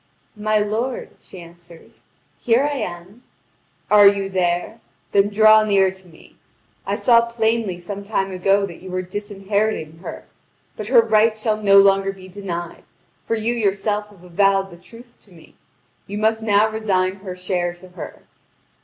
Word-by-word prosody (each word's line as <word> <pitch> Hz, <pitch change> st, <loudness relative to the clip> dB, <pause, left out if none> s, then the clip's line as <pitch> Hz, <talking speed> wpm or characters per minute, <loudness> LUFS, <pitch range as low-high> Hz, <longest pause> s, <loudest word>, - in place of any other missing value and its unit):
"My 215 Hz, 0 st, 0 dB
lord," 220 Hz, +5 st, -2 dB
she 185 Hz, -, -13 dB
answers, 170 Hz, 0 st, -16 dB, 0.3 s
"here 240 Hz, +3 st, +2 dB
I 290 Hz, 0 st, -1 dB
am." 185 Hz, 0 st, -7 dB, 0.7 s
"Are 205 Hz, -1 st, +8 dB
you 200 Hz, -1 st, +2 dB
there? 180 Hz, +4 st, -1 dB, 0.3 s
Then 200 Hz, 0 st, +3 dB
draw 215 Hz, +1 st, +6 dB
near 195 Hz, -3 st, +3 dB
to 190 Hz, -1 st, -17 dB
me! 160 Hz, -2 st, -19 dB, 0.5 s
I -, -, 0 dB
saw 235 Hz, -2 st, +4 dB
plainly 225 Hz, -4 st, -1 dB
some 195 Hz, +3 st, -7 dB
time 195 Hz, -2 st, -2 dB
ago 195 Hz, +2 st, +1 dB
that 175 Hz, -4 st, -11 dB
you 185 Hz, -, -10 dB
were 185 Hz, 0 st, -3 dB
disinheriting 200 Hz, -3 st, -3 dB
her. -, -, -8 dB, 0.5 s
But 215 Hz, -, -7 dB
her 240 Hz, -1 st, +6 dB
right 220 Hz, 0 st, +2 dB
shall 215 Hz, -1 st, -1 dB
no 200 Hz, -1 st, +5 dB
longer 195 Hz, 0 st, +4 dB
be 190 Hz, -1 st, -13 dB
denied; 175 Hz, -3 st, -6 dB, 0.4 s
for 230 Hz, -, -1 dB
you 225 Hz, +2 st, -1 dB
yourself 210 Hz, -1 st, -1 dB
have 195 Hz, -4 st, -19 dB
avowed 195 Hz, +2 st, +1 dB
the 170 Hz, -, -12 dB
truth 235 Hz, +7 st, -16 dB
to 200 Hz, -, -24 dB
me. 165 Hz, -2 st, -18 dB, 0.5 s
You 205 Hz, -, -5 dB
must 220 Hz, +1 st, +1 dB
now 210 Hz, -1 st, +3 dB
resign 195 Hz, -4 st, -1 dB
her 190 Hz, -2 st, -8 dB
share 180 Hz, -1 st, -2 dB
to 180 Hz, +1 st, -16 dB
her." 180 Hz, -3 st, -10 dB
200 Hz, 160 wpm, -20 LUFS, 185-215 Hz, 0.7 s, Are